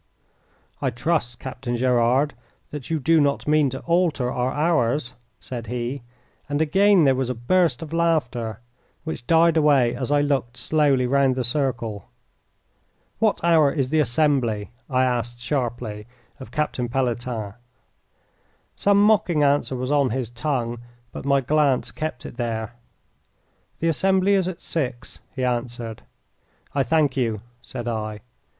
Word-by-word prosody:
"I - - +1
trust, 120 -1 -1
Captain 125 -2 -5
Gerard, 125 +3 +2 0.4
that 145 -4 -7
you 160 -1 0
do 160 +3 +3
not 140 0 0
mean 150 -2 +3
to 130 +1 -6
alter 165 -7 +1
our 125 +1 -1
hours," 145 -5 +1 0.3
said 120 -3 -7
he, 125 +3 -3 0.5
and 145 0 -1
again 190 +4 +4
there 135 -2 +5
was 130 -1 -1
a 125 - -2
burst 165 +4 +1
of 160 0 -9
laughter, 125 -10 0 0.4
which 155 -6 -6
died 165 0 +4
away 140 -6 +4
as 130 +2 -3
I 145 0 +4
looked 135 -4 -1
slowly 145 -5 +2
round 135 0 +2
the 130 - -1
circle. 120 -5 -2 1.1
"What 220 -2 +2
hour 160 -4 +4
is 135 -3 -1
the 155 - +3
assembly?" 120 -7 +1 0.2
I 130 -1 +2
asked, 120 -1 -2
sharply, 120 -5 -3 0.3
of 130 - -9
Captain 130 -5 -2
Pelletan. 120 -4 -2 1.2
Some 200 0 +3
mocking 180 -7 +3
answer 140 -2 +2
was 130 +2 -3
on 140 -3 +3
his 120 -1 -3
tongue, 120 -2 -2 0.3
but - - -8
my 140 -1 +3
glance 145 -1 +1
kept 155 -5 -5
it - - -9
there. 115 -2 -3 1.0
"The 165 - 0
assembly 190 +4 +2
is 190 -2 +2
at 185 -2 -5
six," 130 -7 -4 0.2
he 130 - -2
answered. 120 -2 -3 0.7
"I 140 - +1
thank 145 +1 +2
you," 115 -6 -1 0.2
said 120 -2 -7
I. 110 -2 -3
130 Hz, 145 wpm, -23 LUFS, 120-155 Hz, 1.2 s, there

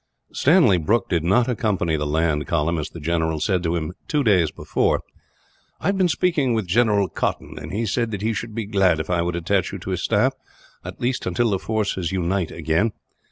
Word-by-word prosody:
Stanley 140 - +4
Brooke 105 +7 +1
did 85 -4 +1
not 105 +8 +3
accompany 105 -9 0
the 75 -1 -2
land 75 0 0
column, 85 0 0
as 75 - -4
the 85 - -10
general 80 0 -1
said 95 +1 +1
to 85 0 -1
him, 80 +1 -3
two 150 -2 +1
days 95 - +3
before: - - 0 0.8
"I - - -9
have 200 - 0
been 185 - +4
speaking 150 -9 +1
with 110 -3 -1
General 105 +1 +2
Cotton, - - -3
and - - -7
he 110 +4 -1
said 115 +2 0
that 105 -2 -5
he 115 +1 +1
should 115 -1 -5
be 115 -2 -2
glad 95 -5 +2
if 80 - -3
I 85 -1 +2
would 85 0 -1
attach 90 +3 0
you - - -5
to - - -6
his - - -2
staff, - - +2 0.5
until 120 -3 -1
the 95 - 0
force 110 -1 -1 0.2
unites 95 -1 -1
again. 85 +8 0
95 Hz, 205 wpm, -22 LUFS, 85-115 Hz, 0.8 s, Stanley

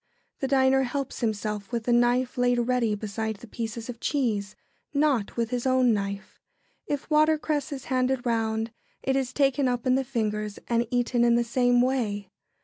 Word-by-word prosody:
] - - -47
The 270 - -1
diner 265 0 +4
helps 270 +1 -3
himself 210 -2 -2
with 235 -2 -2
the 240 - +1
knife 245 +1 +2
laid 245 0 +2
ready 240 -2 +1
beside 220 +1 -3
the 200 - -12
pieces 225 +1 -5
of 240 -2 -7
cheese, 220 -9 -1 0.4
not 280 -9 +1
with 230 -1 -1
his 245 +1 -1
own 255 -2 +4
knife. 200 -1 -4 0.5
If 290 -1 -3
watercress 305 -1 +2
is 270 -2 -6
handed 255 -1 0
round, 225 -1 0 0.3
it 265 - +1
is 265 -2 0
taken 275 0 +2
up 245 -2 -1
in 255 - +3
the 265 +1 +2
fingers 215 -5 -2
and 235 0 +1
eaten 245 0 +1
in 235 0 +4
the 240 - +3
same 245 +1 +3
way. 210 -7 -1
245 Hz, 180 wpm, -26 LUFS, 220-265 Hz, 0.5 s, diner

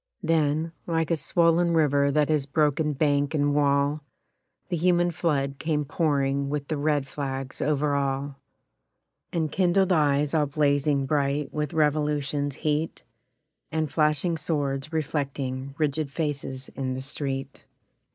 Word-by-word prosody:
Then, 160 -1 +1 0.2
like 165 -1 0
a - - +4
swollen 170 +2 +2
river 145 -2 +3
that 150 +1 +2
has 150 -3 +1
broken 150 +1 +1
bank 145 0 +1
and 145 -1 +2
wall, 145 +1 +2 0.7
The 180 - 0
human 175 +1 +3
flood 140 -5 -1
came 150 -2 -1
pouring 140 -2 0
with 145 -1 -3
the 155 - -1
red 145 -1 +1
flags 135 -1 -5
over 145 0 +1
all, 140 0 -2 0.9
And 160 -3 -1
kindled 190 +1 +2
eyes 145 -2 +2
all 150 -2 +2
blazing 145 -1 +1
bright 140 0 0
with 150 -1 -2
revolution's 150 -2 0
heat, 155 +1 -2 0.7
And 155 -2 -1
flashing 155 +2 +2
swords 145 -2 -2
reflecting 140 -3 -3
rigid 150 -1 -1
faces 140 -4 -3
in 130 -1 -3
the 130 - -4
street. 135 0 -4
145 Hz, 130 wpm, -26 LUFS, 140-155 Hz, 0.9 s, a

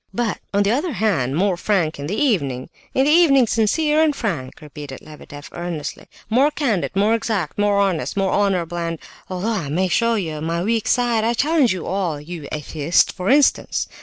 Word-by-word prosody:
"But, 235 -3 -1
on 200 0 +2
the 200 - +1
other 295 +6 -1
hand, 170 - 0
more 190 +2 +2
frank 175 -5 0
in 140 - -4
the 200 - -3
evening! 140 - 0 0.2
In 265 - +3
the 295 - +3
evening 295 -6 +5
sincere 295 +9 +2
and 310 -2 +2
frank," 165 - -4
repeated 150 -2 -9
Lebedeff, 145 -1 -11
earnestly. 175 -3 -5 0.2
"More 255 +7 +3
candid, 245 - -1
more 205 +3 +3
exact, 210 -7 -2
more 205 -1 +2
honest, 195 -3 0
more 195 -1 +1
honourable, 180 -4 0
and... 165 -1 -3 0.3
although 185 +4 -2
I 165 -10 -3
may 180 +5 0
show 230 +5 +2
you 160 -7 -3
my 165 +2 -2
weak 225 +1 0
side, 240 -3 +2
I 235 +1 +1
challenge 295 -1 +2
you 185 -3 -3
all; 180 -5 -2
you 155 -1 -8
atheists, 155 +1 +1
for 185 +2 -4
instance! 285 +1 +2
195 Hz, 190 wpm, -21 LUFS, 165-230 Hz, 0.3 s, evening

